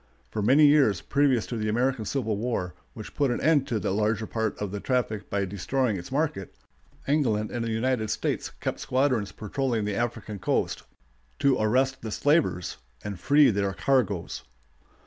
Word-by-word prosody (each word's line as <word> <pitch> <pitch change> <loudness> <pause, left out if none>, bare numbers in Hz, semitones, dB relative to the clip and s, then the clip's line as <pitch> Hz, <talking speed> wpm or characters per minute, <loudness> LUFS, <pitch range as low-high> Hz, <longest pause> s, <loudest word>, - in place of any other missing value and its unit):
For 110 - -2
many 135 +8 +6
years 140 - +5
previous 135 -7 +2
to 115 - -4
the 110 0 -1
American 120 0 0
Civil 115 -5 -1
War, 105 -5 -2 0.2
which - - -9
put 140 -2 +1
an 120 - -1
end 150 -4 +3
to 115 -5 -1
the 95 - -2
larger 110 +2 0
part 110 -1 -2
of 105 -2 -3
the 100 - -4
traffic 110 -4 -1
by 100 0 0
destroying 105 +5 -1
its 90 +3 -7
market, 140 - -2 0.5
England 115 -8 +1
and 120 - -2
the 115 - -2
United 110 0 0
States - - -2
kept - - -5
squadrons 130 -5 0
patrolling 115 0 -2
the 105 - -1
African 110 -2 -3
coast - - 0 0.6
to 140 -2 +3
arrest 130 +5 +1
the 110 - -5
slavers 145 - +1 0.3
and 100 -3 -5
free 145 -2 +5
their 100 -1 -1
"cargoes." 105 -7 0
115 Hz, 170 wpm, -27 LUFS, 105-135 Hz, 0.6 s, many